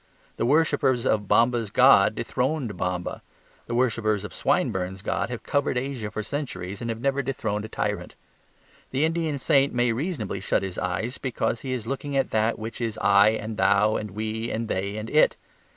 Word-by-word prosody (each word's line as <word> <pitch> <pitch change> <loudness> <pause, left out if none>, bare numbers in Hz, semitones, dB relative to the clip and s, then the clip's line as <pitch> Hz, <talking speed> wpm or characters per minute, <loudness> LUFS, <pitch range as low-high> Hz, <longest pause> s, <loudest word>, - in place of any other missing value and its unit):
The 115 - 0
worshippers 135 -4 +2
of 105 -2 +1
Bomba's 115 -1 +3
god 110 -3 +6
dethroned 130 -3 -1
Bomba. 90 -1 -3 0.5
The 120 - -3
worshippers 115 -4 +1
of 105 - -7
Swinburne's 95 0 -1
god - - -1
have 125 -2 -6
covered 140 -3 0
Asia 125 -4 -3
for 110 - -4
centuries 105 -7 -5
and 120 - -3
have 115 -1 -3
never 140 +2 +1
dethroned 110 -6 -2
a - - -8
tyrant. - - -3 0.7
The 135 +4 +1
Indian 160 -2 -1
saint 135 0 +2
may 120 -1 +2
reasonably 120 - -3
shut 95 - 0
his 95 -2 -4
eyes 100 +8 -2
because 120 -3 -2
he 130 - -4
is 125 -4 -3
looking 140 +3 -3
at 135 - 0
that 110 +1 +1
which 115 +2 -6
is 115 -2 -2
I 100 -1 +6
and 110 0 -6
Thou 100 +3 +3
and 105 - -3
We 110 +3 -3
and 115 +1 -2
They 100 +1 -2
and 110 +1 -5
It. 150 +6 +4
115 Hz, 185 wpm, -25 LUFS, 105-130 Hz, 0.7 s, god